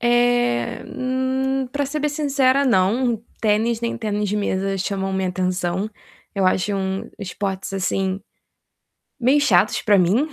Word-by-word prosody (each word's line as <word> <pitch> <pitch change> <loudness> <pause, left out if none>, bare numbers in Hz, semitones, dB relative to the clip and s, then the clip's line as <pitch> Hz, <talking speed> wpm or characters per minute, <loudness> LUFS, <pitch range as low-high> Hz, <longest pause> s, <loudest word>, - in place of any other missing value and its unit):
Eh, 240 - +2
hum, 260 +1 -1
pra 285 0 -1
ser 300 +3 -3
bem 300 - +1
sincera, 280 -2 +2
não. 230 +1 +2 0.2
Tênis, 220 +2 +1
nem 235 0 -2
tênis 210 -2 -2
de 210 - -1
mesa 195 -1 -1
chamam 195 0 -2
minha 190 -1 0
atenção. 185 +1 -1 0.5
Eu 195 -2 +2
acho 190 +2 +1
um 190 0 -2
esportes, 195 0 -4
assim, 190 0 -1 1.0
meio 265 +4 +4
chatos 210 -7 +3
pra 205 -2 +4
mim, 195 - +3
210 Hz, 140 wpm, -22 LUFS, 190-255 Hz, 1.0 s, meio